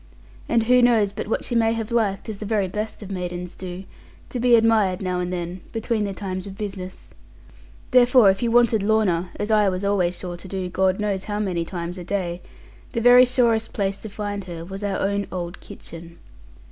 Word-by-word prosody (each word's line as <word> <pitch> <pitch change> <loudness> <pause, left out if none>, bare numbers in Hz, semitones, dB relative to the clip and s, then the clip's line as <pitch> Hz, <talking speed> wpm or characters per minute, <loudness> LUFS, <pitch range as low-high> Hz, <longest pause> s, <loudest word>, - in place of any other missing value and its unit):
And 235 -1 +3
who 250 +2 +5
knows 225 -5 +3
but - - -5
what 225 - -1
she - - -3
may 225 -1 +3
have 225 0 -4
liked 210 -4 0
(as 215 -3 -6
the - - -5
very 210 -3 +1
best 210 +3 -5
of 200 - -8
maidens 180 -1 -4
do) 185 0 -7 0.5
to 250 - -3
be 245 0 +5
admired, 220 -5 +3
now 180 -2 -2
and 180 0 -2
then, 175 0 -4
between 225 -1 -1
the 200 - -3
times 190 -1 -5
of 195 0 -9
business? 195 -3 -7 0.8
Therefore 250 -4 +6
if 190 - -4
you 240 - +1
wanted 235 -2 +4
Lorna 195 -5 +1
(as 210 - -3
I 210 -2 +4
was 185 +1 -3
always 180 -3 +1
sure 175 -1 -6
to 180 - -11
do, 185 -1 -4
God 190 +1 +1
knows 200 -2 -1
how 205 -1 -3
many 185 -5 -1
times 175 +1 -5
a - - -6
day), 180 -2 -3 0.5
the 230 - 0
very 245 +2 +7
surest 235 -3 +1
place 195 -1 -1
to 220 - -8
find 205 -1 -5
her 170 -2 -7
was 195 +3 -7
our 200 -1 -1
own 200 +1 -1
old 175 0 -5
kitchen. 170 0 -11
200 Hz, 210 wpm, -23 LUFS, 185-220 Hz, 0.8 s, very